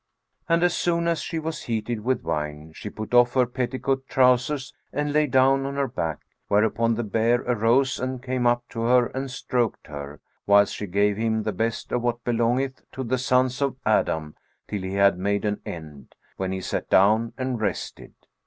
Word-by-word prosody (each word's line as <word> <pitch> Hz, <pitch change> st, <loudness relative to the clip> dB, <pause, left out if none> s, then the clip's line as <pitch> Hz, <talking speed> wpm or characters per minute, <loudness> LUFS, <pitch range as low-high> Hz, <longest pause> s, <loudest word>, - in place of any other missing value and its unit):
And 165 Hz, +1 st, +3 dB
as 175 Hz, -1 st, +3 dB
soon 170 Hz, -1 st, 0 dB
as 170 Hz, -1 st, 0 dB
she 165 Hz, -, -4 dB
was 160 Hz, -1 st, -4 dB
heated 115 Hz, -1 st, -3 dB
with 130 Hz, +2 st, 0 dB
wine, 75 Hz, -1 st, -3 dB
she 105 Hz, -, -7 dB
put 110 Hz, +3 st, -7 dB
off 120 Hz, +1 st, +5 dB
her 130 Hz, -1 st, +4 dB
petticoat 130 Hz, +2 st, -2 dB
trousers 130 Hz, +2 st, +2 dB, 0.2 s
and 145 Hz, +1 st, -1 dB
lay 150 Hz, 0 st, +3 dB
down 135 Hz, +1 st, +4 dB
on 140 Hz, -, -4 dB
her 140 Hz, -1 st, 0 dB
back; 85 Hz, -10 st, -3 dB, 0.3 s
whereupon 110 Hz, +2 st, +2 dB
the 120 Hz, -, -2 dB
bear 115 Hz, +3 st, +1 dB
arose 125 Hz, +3 st, +2 dB
and 130 Hz, 0 st, -3 dB
came 125 Hz, -1 st, -1 dB
up 120 Hz, 0 st, +2 dB
to 115 Hz, -, -5 dB
her 125 Hz, +1 st, +4 dB
and 135 Hz, +1 st, -3 dB
stroked 125 Hz, -2 st, -2 dB
her, 70 Hz, 0 st, -8 dB, 0.3 s
whilst 100 Hz, 0 st, +5 dB
she 105 Hz, -, -5 dB
gave 100 Hz, +2 st, +1 dB
him 110 Hz, -1 st, 0 dB
the 110 Hz, -, -2 dB
best 115 Hz, +4 st, -2 dB
of 125 Hz, -, 0 dB
what 120 Hz, 0 st, -1 dB
belongeth 120 Hz, +3 st, 0 dB
to 130 Hz, -, -4 dB
the 130 Hz, +1 st, -1 dB
sons 125 Hz, +1 st, +1 dB
of 140 Hz, -2 st, 0 dB
Adam 80 Hz, -8 st, +1 dB, 0.3 s
till 105 Hz, -, -3 dB
he 95 Hz, +1 st, -4 dB
had 100 Hz, -2 st, +4 dB
made 100 Hz, +2 st, 0 dB
an 105 Hz, -1 st, -1 dB
end, 75 Hz, -5 st, -9 dB, 0.2 s
when 95 Hz, -1 st, -3 dB
he 95 Hz, 0 st, -3 dB
sat -, -, -3 dB
down 110 Hz, +4 st, +4 dB
and 130 Hz, -3 st, -2 dB
rested. 100 Hz, -3 st, -4 dB
120 Hz, 190 wpm, -25 LUFS, 105-130 Hz, 0.3 s, off